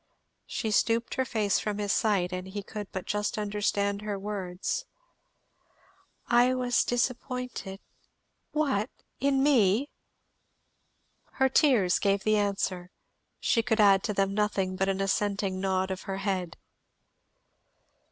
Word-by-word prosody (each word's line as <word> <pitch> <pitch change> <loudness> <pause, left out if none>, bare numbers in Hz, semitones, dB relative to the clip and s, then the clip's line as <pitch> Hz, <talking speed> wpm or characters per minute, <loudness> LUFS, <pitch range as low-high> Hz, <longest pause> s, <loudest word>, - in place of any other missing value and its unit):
She 225 -4 -2
stooped 230 +2 +1
her 260 - 0
face 210 -5 +1
from 210 -1 -3
his 205 -2 0
sight 195 -5 +1
and 185 +1 -4
he 200 +1 -5
could 210 0 -7
but 185 - -5
just 210 +1 -2
understand 205 -1 -1
her 210 -1 -3
words. 195 - -3 1.4
"I 245 +2 +4
was 250 -1 +2
disappointed 245 -4 -3 0.4
" - - -49
"What, 255 -6 0 0.3
in 275 -1 +2
me!" 250 -2 +3 1.4
Her 265 0 +2
tears 250 - +3
gave 200 -1 +1
the 215 0 +3
answer; 195 -3 -1 0.5
she 230 - +2
could 225 -1 0
add 200 -2 +6
to 210 - -1
them 195 0 +1
nothing 200 -3 0
but 190 +1 0
an 195 0 -1
assenting 195 -1 0
nod 190 0 0
of 185 0 -4
her 195 - -2
head. 190 -4 -2
205 Hz, 135 wpm, -28 LUFS, 195-230 Hz, 1.4 s, add